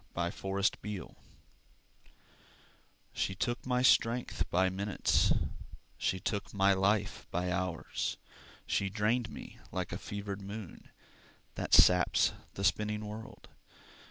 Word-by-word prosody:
Fletcher 85 Hz, 0 st, -2 dB
McGee 100 Hz, 0 st, -2 dB, 2.0 s
She 95 Hz, -, -1 dB
took 120 Hz, +5 st, -2 dB
my 125 Hz, 0 st, +2 dB
strength 120 Hz, -1 st, +3 dB
by 95 Hz, +2 st, +3 dB
minutes, 95 Hz, +2 st, +1 dB, 0.6 s
She 95 Hz, -, -1 dB
took 100 Hz, +3 st, -3 dB
my 100 Hz, 0 st, +5 dB
life 100 Hz, +1 st, +1 dB
by 90 Hz, +1 st, -1 dB
hours, 90 Hz, -2 st, -2 dB, 0.5 s
She 100 Hz, -, 0 dB
drained 110 Hz, +4 st, +1 dB
me -, -, -10 dB
like -, -, -3 dB
a -, -, -4 dB
fevered 100 Hz, -1 st, -5 dB
moon 100 Hz, -1 st, -8 dB, 0.6 s
That -, -, +2 dB
saps 90 Hz, -1 st, +6 dB, 0.2 s
the 100 Hz, -, -4 dB
spinning 105 Hz, +1 st, +1 dB
world. 110 Hz, +2 st, -9 dB
100 Hz, 110 wpm, -32 LUFS, 95-105 Hz, 2.0 s, saps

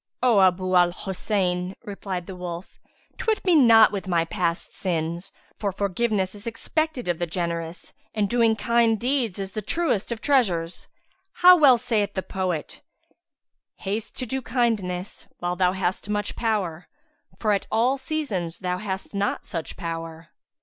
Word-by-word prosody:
'" -, -, -18 dB
"O 220 Hz, -4 st, +5 dB
Abu 185 Hz, 0 st, +4 dB
'l 180 Hz, -1 st, +4 dB
Hosayn," 185 Hz, -1 st, -1 dB
replied 195 Hz, -3 st, -5 dB
the 190 Hz, -, -8 dB
wolf, 180 Hz, 0 st, -7 dB, 0.4 s
"twit 440 Hz, -3 st, 0 dB
me 365 Hz, -, +4 dB
not 230 Hz, -6 st, +7 dB
with 195 Hz, -2 st, -4 dB
my 170 Hz, -2 st, +2 dB
past 170 Hz, 0 st, -2 dB
sins; 170 Hz, -1 st, -2 dB, 0.3 s
for 200 Hz, -2 st, -1 dB
forgiveness 200 Hz, 0 st, 0 dB
is 205 Hz, +2 st, -11 dB
expected 275 Hz, -, -2 dB
of 175 Hz, -2 st, 0 dB
the 175 Hz, -, -1 dB
generous 170 Hz, 0 st, -4 dB, 0.2 s
and 210 Hz, -2 st, +1 dB
doing 230 Hz, 0 st, +3 dB
kind 230 Hz, 0 st, +2 dB
deeds 245 Hz, -5 st, 0 dB
is 195 Hz, -1 st, -4 dB
the 215 Hz, -, -4 dB
truest 240 Hz, -, 0 dB
of 235 Hz, -, -3 dB
treasures. 185 Hz, -12 st, +1 dB, 0.5 s
How 360 Hz, +1 st, +8 dB
well 280 Hz, -7 st, +7 dB
saith 215 Hz, -4 st, 0 dB
the 190 Hz, -, -1 dB
poet, 185 Hz, -5 st, -3 dB, 0.9 s
'Haste 210 Hz, +3 st, -4 dB
to 255 Hz, -, -2 dB
do 265 Hz, +3 st, -3 dB
kindness 215 Hz, -7 st, -1 dB
while 175 Hz, 0 st, -2 dB
thou 180 Hz, 0 st, +2 dB
hast 190 Hz, +1 st, -2 dB
much 210 Hz, 0 st, -1 dB
power, 190 Hz, -7 st, -1 dB, 0.2 s
* -, -, -34 dB
For 215 Hz, -, +1 dB
at 200 Hz, -, 0 dB
all 245 Hz, +5 st, +2 dB
seasons 230 Hz, -, -3 dB
thou 180 Hz, 0 st, -2 dB
hast 195 Hz, -1 st, -5 dB
not 200 Hz, 0 st, -1 dB
such 165 Hz, -2 st, -5 dB
power.'" 165 Hz, -1 st, -6 dB
195 Hz, 160 wpm, -25 LUFS, 180-230 Hz, 0.9 s, How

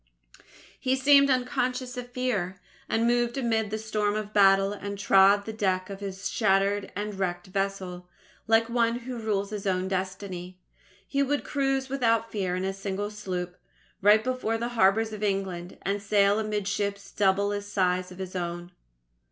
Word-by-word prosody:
He 260 Hz, 0 st, +1 dB
seemed 280 Hz, +1 st, +5 dB
unconscious 255 Hz, 0 st, 0 dB
of 245 Hz, 0 st, -6 dB
fear, 215 Hz, -8 st, -2 dB, 0.3 s
and 225 Hz, +1 st, +1 dB
moved 240 Hz, +1 st, +1 dB
amid 225 Hz, -4 st, 0 dB
the 215 Hz, -, -2 dB
storm 215 Hz, -1 st, -1 dB
of 215 Hz, 0 st, -4 dB
battle, 195 Hz, 0 st, +5 dB
and 200 Hz, 0 st, -6 dB
trod 200 Hz, 0 st, +5 dB
the 220 Hz, -, -5 dB
deck 190 Hz, -3 st, -1 dB
of 195 Hz, -, -7 dB
his 195 Hz, -1 st, -5 dB
shattered 200 Hz, -1 st, +1 dB
and 205 Hz, 0 st, -4 dB
wrecked 175 Hz, -2 st, -2 dB
vessel, 185 Hz, -2 st, -3 dB, 0.4 s
like 225 Hz, 0 st, +4 dB
one 235 Hz, 0 st, +1 dB
who 245 Hz, 0 st, -6 dB
rules 205 Hz, -2 st, -1 dB
his 205 Hz, -2 st, -4 dB
own 185 Hz, 0 st, 0 dB
destiny. 185 Hz, -1 st, -4 dB, 0.5 s
He 280 Hz, -, 0 dB
would 285 Hz, +1 st, 0 dB
cruise 270 Hz, -1 st, 0 dB
without 230 Hz, -4 st, +1 dB
fear 190 Hz, -4 st, -1 dB
in 185 Hz, +1 st, -2 dB
a 195 Hz, -, -1 dB
single 195 Hz, +1 st, -4 dB
sloop, 180 Hz, -4 st, -5 dB, 0.4 s
right 210 Hz, +2 st, +6 dB
before 255 Hz, -3 st, -1 dB
the 235 Hz, +1 st, -3 dB
harbours 220 Hz, -1 st, +2 dB
of 215 Hz, -, -7 dB
England, 190 Hz, -3 st, -2 dB
and 200 Hz, +1 st, -1 dB
sail 200 Hz, 0 st, +3 dB
amid 210 Hz, -2 st, -2 dB
ships 200 Hz, 0 st, -2 dB
double 200 Hz, 0 st, +2 dB
the 205 Hz, 0 st, -2 dB
size 185 Hz, -3 st, 0 dB
of 180 Hz, -, -11 dB
his 190 Hz, -1 st, -6 dB
own. 175 Hz, 0 st, -4 dB
205 Hz, 170 wpm, -27 LUFS, 190-230 Hz, 0.5 s, right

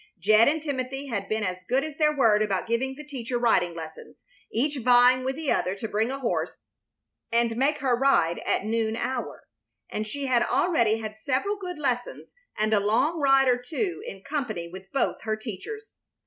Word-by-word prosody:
Jed 215 Hz, +5 st, +5 dB
and 310 Hz, +1 st, +1 dB
Timothy 270 Hz, -1 st, -4 dB
had 200 Hz, -4 st, -3 dB
been 215 Hz, 0 st, 0 dB
as 185 Hz, -2 st, -3 dB
good 260 Hz, +3 st, +2 dB
as 310 Hz, 0 st, -7 dB
their 305 Hz, -1 st, +4 dB
word 220 Hz, -5 st, +4 dB
about 200 Hz, -3 st, 0 dB
giving 255 Hz, +3 st, -1 dB
the 300 Hz, -, -9 dB
teacher 255 Hz, -4 st, -4 dB
riding 185 Hz, -8 st, +2 dB
lessons, 160 Hz, -1 st, -10 dB, 0.3 s
each 285 Hz, +5 st, 0 dB
vying 250 Hz, +1 st, +5 dB
with 265 Hz, +1 st, -2 dB
the 310 Hz, -1 st, -2 dB
other 185 Hz, +2 st, 0 dB
to 210 Hz, +3 st, -5 dB
bring 220 Hz, +3 st, 0 dB
a 270 Hz, -, -3 dB
horse 255 Hz, -4 st, -2 dB, 0.7 s
and 235 Hz, 0 st, +2 dB
make 280 Hz, +5 st, +1 dB
her 260 Hz, -3 st, +2 dB
ride 235 Hz, -10 st, +2 dB
at -, -, -1 dB
noon 220 Hz, 0 st, 0 dB
hour, 245 Hz, 0 st, -4 dB, 0.5 s
and 215 Hz, 0 st, -3 dB
she 280 Hz, +5 st, -4 dB
had 250 Hz, -3 st, +3 dB
already 235 Hz, -11 st, +2 dB
had 215 Hz, -1 st, -7 dB
several 280 Hz, -, 0 dB
good 365 Hz, -4 st, -6 dB
lessons 250 Hz, -4 st, -3 dB, 0.3 s
and 215 Hz, +1 st, +1 dB
a 210 Hz, -, +5 dB
long 230 Hz, +11 st, +1 dB
ride 270 Hz, -2 st, +4 dB
or 250 Hz, -1 st, +3 dB
two 345 Hz, -, -3 dB
in 195 Hz, 0 st, -8 dB
company 245 Hz, -, -3 dB
with 190 Hz, +2 st, -11 dB
both 275 Hz, -, 0 dB
her 220 Hz, -1 st, -1 dB
teachers. 250 Hz, -, -8 dB
245 Hz, 190 wpm, -26 LUFS, 215-275 Hz, 0.7 s, Jed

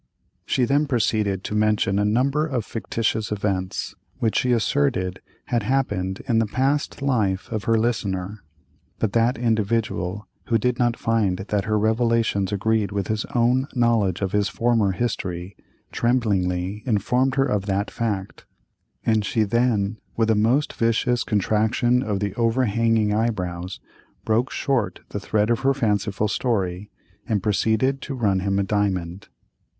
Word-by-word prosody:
She 125 Hz, -, +2 dB
then 145 Hz, +4 st, +2 dB
proceeded 105 Hz, -6 st, 0 dB
to -, -, -4 dB
mention 105 Hz, -2 st, +2 dB
a 105 Hz, -, +2 dB
number 135 Hz, +8 st, +2 dB
of 125 Hz, -8 st, -2 dB
fictitious 110 Hz, -1 st, -2 dB
events 100 Hz, -3 st, -2 dB, 0.2 s
which 110 Hz, -2 st, 0 dB
she 125 Hz, -, +2 dB
asserted 95 Hz, -4 st, 0 dB, 0.2 s
had 120 Hz, -1 st, 0 dB
happened 100 Hz, -6 st, -1 dB
in 115 Hz, -2 st, +3 dB
the 115 Hz, -, +1 dB
past 135 Hz, +5 st, -1 dB
life 105 Hz, -9 st, 0 dB
of 110 Hz, -3 st, -3 dB
her 115 Hz, 0 st, +3 dB
listener, 105 Hz, -4 st, -2 dB, 0.6 s
but 110 Hz, -3 st, -1 dB
that 115 Hz, +2 st, +2 dB
individual, 110 Hz, -4 st, -1 dB, 0.2 s
who 115 Hz, -, +2 dB
did 120 Hz, +2 st, 0 dB
not 120 Hz, -1 st, +2 dB
find 110 Hz, -5 st, +1 dB
that 100 Hz, +1 st, -2 dB
her 110 Hz, 0 st, +1 dB
revelations 110 Hz, -2 st, +1 dB
agreed 105 Hz, 0 st, 0 dB
with 100 Hz, -2 st, -2 dB
his 110 Hz, 0 st, -1 dB
own 125 Hz, +3 st, +3 dB
knowledge 115 Hz, -7 st, +2 dB
of 95 Hz, -2 st, -1 dB
his 105 Hz, -1 st, +1 dB
former 115 Hz, -2 st, +1 dB
history, 95 Hz, -3 st, -3 dB, 0.4 s
tremblingly 100 Hz, -5 st, 0 dB
informed 125 Hz, +4 st, +1 dB
her 135 Hz, 0 st, +3 dB
of 105 Hz, -6 st, -1 dB
that 100 Hz, +1 st, -1 dB
fact; 105 Hz, -5 st, -4 dB, 0.6 s
and 110 Hz, -2 st, +2 dB
she 110 Hz, +2 st, +1 dB
then, 110 Hz, -1 st, +1 dB, 0.2 s
with 115 Hz, -1 st, +3 dB
a -, -, +3 dB
most 120 Hz, +8 st, +2 dB
vicious 115 Hz, +1 st, +1 dB
contraction 110 Hz, +4 st, +1 dB
of 105 Hz, -6 st, -2 dB
the 100 Hz, -1 st, -2 dB
overhanging 115 Hz, -2 st, +2 dB
eyebrows, 95 Hz, -5 st, -2 dB, 0.5 s
broke 115 Hz, +4 st, +1 dB
short 120 Hz, -10 st, -1 dB
the 105 Hz, -, -4 dB
thread 105 Hz, +2 st, 0 dB
of 120 Hz, -, +2 dB
her 135 Hz, 0 st, +2 dB
fanciful 105 Hz, -4 st, 0 dB
story, 100 Hz, -4 st, -1 dB, 0.4 s
and 105 Hz, -4 st, 0 dB
proceeded 110 Hz, +6 st, +1 dB
to 140 Hz, -, -5 dB
"run 100 Hz, -6 st, +1 dB
him 95 Hz, +1 st, 0 dB
a 100 Hz, -, +2 dB
diamond." 95 Hz, -2 st, -1 dB
110 Hz, 150 wpm, -23 LUFS, 100-120 Hz, 0.6 s, in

